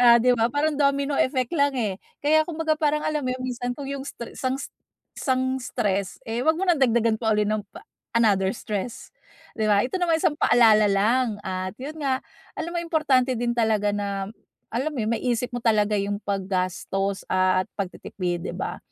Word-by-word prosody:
oh 240 -1 +8
'di 250 +1 +4
ba, 230 +1 +2
parang 295 +1 +1
domino 280 0 +2
effect 255 -2 0
lang 285 -1 +3
eh. 210 -6 -1 0.3
Kaya 310 +1 +5
kumbaga 315 -1 0
parang 300 -1 +2
alam 305 -1 0
mo 255 - 0
yun 255 - -7
minsan 245 0 -3
kung 280 -2 -6
yung 275 -1 -4
stre 235 - -8
sang 260 0 -1 0.6
isang 260 0 0
stress 200 -6 -1
eh, 225 +1 -3
wag 320 - +5
mo 365 - -4
ng 350 -4 +3
dagdagan 230 -3 +3
pa 220 -2 +2
uli 210 - +3
ng 215 +1 0 0.6
another 200 -5 +3
stress, 210 +2 -5 0.5
di 215 - +1
ba? 205 0 +5
Ito - - -9
naman 345 -2 +2
isang 305 - +2
paalala 220 -6 +5
lang, 220 +4 +2
at 185 +1 -3
yun 295 +3 -5
nga, 270 -3 0 0.4
alam 340 - -3
mo - - 0
importante 280 -6 +2
din 240 0 0
talaga 220 -3 +2
na, 200 -1 -2 0.4
alam 260 +7 -1
mo 265 - -5
yun 215 - -1
maisip 245 +1 -1
mo 245 - -1
talaga 215 -2 +3
yung 200 +1 -1
pag-gastos 195 0 -2
at 185 0 +2
pag-titipid, 180 -2 -3
di - - -8
ba? - - -4
235 Hz, 185 wpm, -25 LUFS, 205-275 Hz, 0.6 s, oh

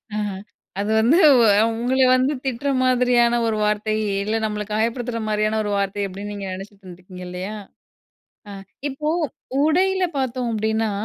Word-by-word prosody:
ஆ - - -2 0.6
அது 205 +1 -1
வந்து 250 +10 +4 0.6
உங்கள 245 +3 -1 0.2
வந்து 260 +3 +1
திட்டுற 265 +2 -2
மாதிரியான 245 -1 +3
ஒரு 220 -1 0
வார்த்தை 210 +1 0 0.3
இல்ல 215 +2 -1
நம்மள 210 -1 -3
காயப்படுத்துற 230 +2 -1
மாரியான 215 +1 0
ஒரு 205 - -3
வார்த்தை 200 +1 -2
அப்டின்னு 200 +2 -7
நீங்க 200 -1 -6
நெனைச்சிட்டு 195 +1 -10
இருந்துருக்கீங்க 180 0 -11
இல்லையா? 185 +4 -5 1.0
ஆ - - -7 0.4
இப்போ 300 +3 -3 0.5
உடையில 375 +4 +2
பார்த்தோம் 255 -2 -2
அப்டின்னா, 220 0 0
220 Hz, 135 wpm, -22 LUFS, 205-250 Hz, 1.0 s, வந்து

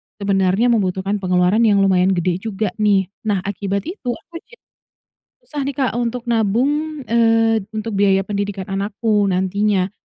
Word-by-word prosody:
sebenarnya 200 +3 +1
membutuhkan 195 -1 0
pengeluaran 180 +2 +2
yang 200 -2 +4
lumayan 190 0 +3
gede 175 0 0
juga 210 -1 -3
nih. 200 -3 +2 0.2
Nah 200 -3 0
akibat 200 0 -3
itu, 280 - -4
aku 335 0 -11
jadi 470 - -19 0.8
susah 295 - -6
nih, 280 - -3
Kak, 260 -2 0
untuk 240 0 -2
nabung, 275 +8 0
eee, 225 -2 +3
untuk 215 -1 -3
biaya 195 -1 +3
pendidikan 200 -1 -4
anakku 205 +1 0
nantinya. 190 +1 0
205 Hz, 145 wpm, -19 LUFS, 195-230 Hz, 0.8 s, yang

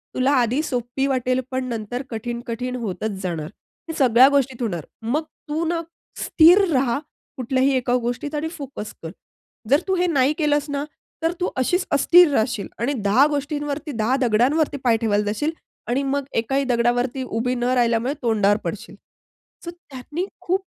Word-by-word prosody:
तुला 260 +2 +2
आधी 250 +2 +2
सोपी 245 +2 -2
वाटेल, 255 -1 0
पण 260 0 -2
नंतर 235 +1 -4
कठीण, 235 +1 -4
कठीण 250 +2 -3
होतच 200 -1 -4
जाणार. 165 -4 -3 0.4
हे 325 - -2
सगळ्या 255 -2 +6
गोष्टीत 265 -2 0
होणार. 175 -9 -2 0.2
मग 260 +8 -1 0.3
तू 315 +3 -1
ना, 335 0 -1 0.4
स्थिर 350 +5 +6
रहा 255 0 +1 0.4
कुठल्याही 260 +2 +1
एका 245 -1 0
गोष्टीत 290 +5 -3
आणि 300 +2 -1
फोकस 270 -7 -7
कर. 160 - -5 0.6
जर 280 +3 +4
तू 380 - +2
हे 360 0 +1
नाही 265 +3 +4
केलंस 295 -2 +1
ना, 285 0 -2 0.4
तर 330 - +2
तू 360 - 0
अशीच 355 +9 +1
अस्थिर 345 +3 +6
राहशील 220 -4 0
आणि 260 +5 0
दहा 250 +9 +5
गोष्टींवरती, 290 +1 -3
दहा 230 +1 0
दगडांवरती 275 +7 +2
पाय 235 -3 +3
ठेवायला 210 -2 +1
जाशील 220 +10 -1 0.4
आणि 255 +3 0
मग 280 -1 -1 0.2
एकाही 270 +4 0
दगडावरती 245 +2 +1
उभी 250 +1 -2
न 240 - -3
राहिल्यामुळे 240 +1 +2
तोंडावर 210 -4 +2
पडशील. - - -6 0.7
सो - - -4
त्यांनी 300 0 -6 0.2
खूप 375 +2 -1
255 Hz, 160 wpm, -22 LUFS, 235-290 Hz, 0.7 s, सगळ्या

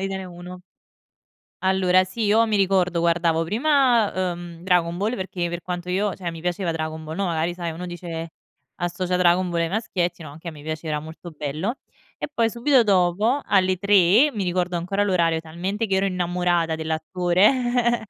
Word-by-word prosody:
Italia 190 -1 -4
1. 180 +1 -10 1.0
Allora 185 -1 +3
sì, 185 +5 -5
io 220 +3 +4
mi 215 -1 +1
ricordo 185 -3 +2
guardavo 170 -1 +2
prima, 230 - +2
uhm, 170 -1 -9
"Dragon 175 -2 +1
Ball" 215 +6 -1
perché 185 -3 -3
per 175 0 -4
quanto 180 0 -5
io 195 +2 0
cioè, 180 -3 -5
mi 165 -1 -9
piaceva 175 0 -1
"Dragon 155 0 -4
Ball", 155 +1 -6
no, 200 0 -1
magari 165 0 -1
sai, 175 -1 -4
uno 170 +3 -7
dice 170 -2 -6 0.5
associa 180 0 -2
"Dragon 180 0 +3
Ball" 170 -1 -1
ai 165 - +1
maschietti 185 -4 -2
no, 155 - -9
anche 160 +4 -10
a - - -5
me 150 -2 -12
piaceva, 155 0 -3
molto 160 +3 -10
bello. 155 - -3 0.4
E - - -5
poi 230 -5 +2
subito 245 +3 +3
dopo, 205 +6 +2
alle 185 -2 +2
3:00- 200 - +4
mi 210 - -3
ricordo 180 -1 -1
ancora 195 +4 -1
l'orario, 170 -4 +2
talmente 180 +7 -3
che 195 -2 +1
ero 195 +1 +2
innamorata 175 -3 0
dell'attore- 195 +10 +1
180 Hz, 175 wpm, -23 LUFS, 170-195 Hz, 1.0 s, io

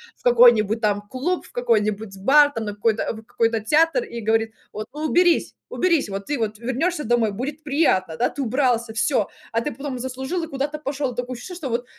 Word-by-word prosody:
в - - -30
какой-нибудь 235 -3 +5
там 205 -1 +1
клуб, 310 +10 -2
в - - -19
какой-нибудь 215 -4 0
бар, 290 +8 +5
там 225 - -3
на 205 - -4
какой-то, 220 +1 +1
в 220 0 -10
какой-то 230 -1 0
театр 325 - +3
и 235 - -7
говорить: 225 +1 +1 0.2
"Вот 215 +1 -5
уберись 335 +3 +2
уберись, 340 -5 +1
вот 195 0 -5
ты 290 - +1
вот 215 -2 -2
вернешься 285 +8 -1
домой, 230 -2 +2
будет 275 +8 -5
приятно". 275 - +1
Да, 245 - +2
ты 285 - -5
убрался, 245 -3 0
всё, 230 -2 +1 0.2
а 230 - +1
ты 295 - -3
потом 275 -1 -5
заслужил, 265 +7 -3
и - - -4
куда-то 290 0 -3
пошел. 275 -2 -3
Такое 245 +1 -3
ощущение 345 +9 -8
что 300 -7 -5
вот 240 +1 -2
245 Hz, 200 wpm, -22 LUFS, 220-290 Hz, 0.2 s, какой-нибудь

